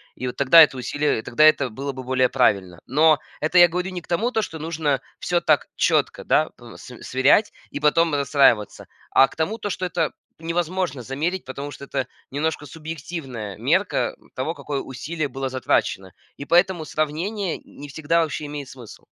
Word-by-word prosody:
И 125 - -4
вот 125 - -5
тогда 140 +4 +7
это 145 -4 +5
усилие 145 +1 -1
и - - -4
тогда 120 +6 +2
это 140 -4 +4
было 135 +5 -5
бы 130 -1 -8
более 130 0 +2
правильно. 95 -9 +1
Но 155 +3 +4 0.2
это 155 +4 +1
я 175 0 +9
говорю 180 +3 -3
не 180 -1 -5
к - - -21
тому, 220 +8 0
то, 225 - +1
что 160 -5 -6
нужно 155 -4 -1 0.2
всё 175 -1 0
так 155 -4 +2
четко, - - +1
да, - - +2
э, - - -12
св - - -12
сверять 135 +11 +3 0.2
и 145 - -4
потом 160 +2 +3
расстраиваться. 140 -7 +2 0.3
А 135 - +6
к - - -16
тому, 165 +8 -1
то, 205 - -4
что 185 - -3
это 165 -2 -1 0.3
невозможно 170 -3 -2
замерить, 160 +9 -3
потому 140 +2 -6
что 140 - -10
это 135 -1 -3 0.2
немножко 150 +1 -2
субъективная 140 - -7
мерка - - 0 0.2
того, 155 +6 -3
какое 140 -4 -4
усилие 145 +4 -4
было 135 -1 -4
затрачено. 95 -7 -1 0.2
И 140 - -7
поэтому 175 0 +3
сравнение 170 +6 -2
не 145 - -12
всегда 160 +4 +1
вообще 150 -1 -4
имеет 145 -2 -6
смысл. 120 -5 -12
150 Hz, 185 wpm, -23 LUFS, 130-165 Hz, 0.3 s, я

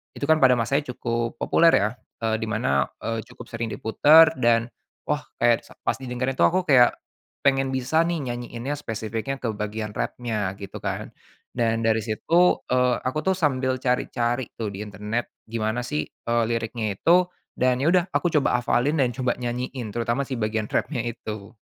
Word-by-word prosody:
Itu - - -7
kan 160 0 +4
pada 125 -1 +7
masanya 135 +3 0
cukup 115 0 -2
populer 165 0 +4
ya, 105 +2 +2 0.3
eee, 110 0 +1
di 110 - -3
mana, 70 -9 +1 0.2
eee, 115 0 -2
cukup 125 - -12
sering 115 0 -3
diputer 155 +8 +6
dan 115 -1 +3 0.4
wah, - - 0 0.2
kayak - - +3
s - - -21
pas - - +1
didengarin 130 +1 -3
tu - - +3
aku 185 +1 +1
kayak 125 -4 +6 0.5
pengen 135 -1 +2
bisa 145 +6 +2
nih 170 -3 -1
nyanyiinnya, 120 +3 -4
spesifiknya 115 +1 -4
ke 115 - -1
bagian 105 0 -4
rap-nya 110 -6 -2
gitu 100 - -7
kan, - - -3 0.5
dan 115 -1 +1
dari 110 0 +3
situ, 170 +12 +2
eee, 125 -1 +3
aku 150 +4 -1
tuh 190 0 +2
sambil 130 -6 +1
cari-cari 125 -1 0
tuh 110 - -2
di 95 - -8
internet 105 +3 -4 0.2
gimana 110 +1 -2
sih, 150 +5 -2
eee, 115 0 -1
liriknya 115 -2 -2
itu, 180 - +4 0.3
dan 125 0 +2
ya 150 - +1
udah 180 -2 +4
aku 175 - +2
coba 135 -4 +3
hafalin 130 +5 +1
dan 130 -2 +3
coba 130 -2 0
nyanyiin 125 0 -4
terutama 120 +3 0
si 130 - -3
bagian 110 0 -1
rap-nya 130 -6 0
itu. 110 -1 -7
120 Hz, 175 wpm, -24 LUFS, 115-135 Hz, 0.5 s, pada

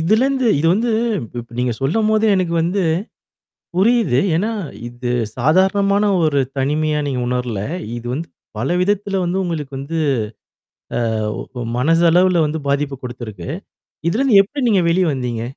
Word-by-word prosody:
இதிலிருந்து 250 +9 +2
இது 155 - +1
வந்து 230 +5 +1 0.3
இப் 115 -3 -8
இப்ப 120 - -14
நீங்க 125 -1 +1
சொல்லும்போதே, 215 +9 +2
எனக்கு 180 -3 0
வந்து, 180 +4 0 1.0
புரியிது. 205 - +3 0.2
ஏன்னா, 205 +7 0 0.4
இது 120 0 -5 0.3
சாதாரணமான 190 - +3 0.2
ஒரு 145 -3 +2 0.2
தனிமையா 150 +3 +1
நீங்க 130 -3 -1
உணர்ல. 125 -4 -2 0.4
இது 120 0 -7
வந்து, 160 +4 -4 0.3
பல 125 +5 -1
விதத்தில 200 0 0
வந்து 175 +2 -1
உங்களுக்கு 155 -5 -4
வந்து, 155 +4 -4 1.0
ஆ - - +1 0.6
ஓ 120 - -3 0.2
மனசளவுல 170 +4 +4
வந்து 155 +2 -2
பாதிப்ப 140 -1 0
குடுத்திருக்கு. 120 -7 -7 0.6
இதிலிருந்து 225 +3 +4
எப்டி 255 +5 -2
நீங்க 195 -5 +3
வெளியே 175 0 +2
வந்தீங்க? 120 -3 -3
165 Hz, 135 wpm, -19 LUFS, 130-200 Hz, 1.0 s, மனசளவுல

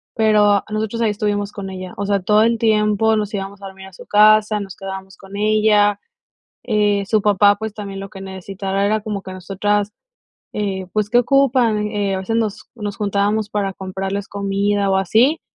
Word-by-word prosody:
pero 210 -2 +3
nosotros 220 +2 -3
ahí 225 - +2
estuvimos 205 -1 -2
con 195 -2 -7
ella, 185 -1 -7
o 200 - -2
sea, 200 0 +1
todo 210 +3 +3
el 230 0 +1
tiempo 215 0 +2
nos 210 -1 -2
íbamos 200 0 -5
a - - -6
dormir 190 0 -11
a 190 - -16
su - - -13
casa, 215 0 +4
nos 195 -2 -7
quedábamos 190 0 -8
con 195 0 -12
ella, 210 -1 +3 0.6
eh, 210 -3 +1
su 215 0 +1
papá, 205 0 +4
pues, 220 0 -6
también 200 -2 -7
lo 195 0 -7
que 195 -1 -11
necesitara 195 +1 -3
era 215 +1 +1
como 210 -2 -5
que 190 - -8
nosotras, 200 +3 -1 0.6
eh, 195 -3 -3
pues, 210 -1 -1
¿qué 240 - +4
ocupan? 245 -5 +2
Eh, 205 -2 -1
a - - -2
veces 190 +4 -2
nos 220 -3 -2
nos 205 -3 -5
juntábamos 205 +1 0
para 200 -2 -1
comprarles 190 +1 -5
comida, 200 0 0
o, 190 - +2
así, 225 - +3
205 Hz, 190 wpm, -19 LUFS, 195-215 Hz, 0.6 s, casa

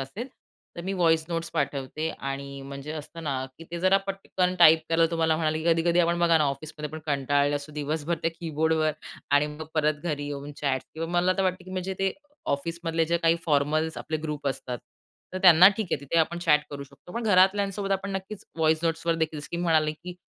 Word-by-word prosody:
असेल, 200 - -6 0.5
तर 170 - -4
मी 190 - -2
voice 165 -4 +3
notes 165 0 -3
पाठवते 145 0 -2
आणि 140 0 -5
म्हणजे 140 +2 -7
असतं 160 +2 -8
ना, 135 -3 -1
की 165 - -10
ते 170 - -4
जरा 185 +1 +5
पटकन 190 -2 -1
टाइप 160 -2 +8
केलं 165 0 +4
तुम्हाला 160 -1 +2
म्हणाले, 155 -1 0
की 160 - -6
कधी-कधी 170 +1 +2
आपण 170 0 +1
बघा 170 -2 +4
ना, 150 - +3
ऑफिस 140 +3 -3
पण 150 +1 -5
कंटाळले 145 0 +1
असो, 145 +1 -8
दिवसभर 150 +3 -2
त्या 165 - +1
कीबोर्डवर 160 -1 +1 0.4
आणि 145 +1 +4
मग 150 +1 -7
परत 155 -1 +2
घरी 150 -4 -2
येऊन 145 0 -6
चॅट 135 -3 -1
किंवा 165 +1 -4
मला 185 +1 +3
तर - - +3
वाटतं, 185 0 -1
की 185 - -11
म्हणजे 185 +1 -3
ते 195 -1 +1 0.4
ऑफिसमधले 165 +3 -1
जे 170 +2 +1
काही 165 0 +3
फॉर्मल्स 155 +2 +1
आपले 155 - -3
ग्रुप 150 -2 -4
असतात, 125 -2 -4 0.5
तर 185 - -3
त्यांना 180 0 +9
ठीक 220 - -2
आहे - - 0
तिथे 145 +4 0
आपण 170 +2 +1
चॅट 150 -3 +4
करू 140 -1 -6
शकतो. 175 - -16
पण 235 - -3
घरातल्यांसोबत 195 0 +3
आपण 195 +1 -2
नक्कीच 195 +1 -6
व्हॉईस 160 0 +2
नोट्सवर 165 0 0
देखील 155 +1 -3
म्हणाले, 155 -3 +2
की 175 +4 -9
160 Hz, 200 wpm, -26 LUFS, 150-175 Hz, 0.5 s, त्यांना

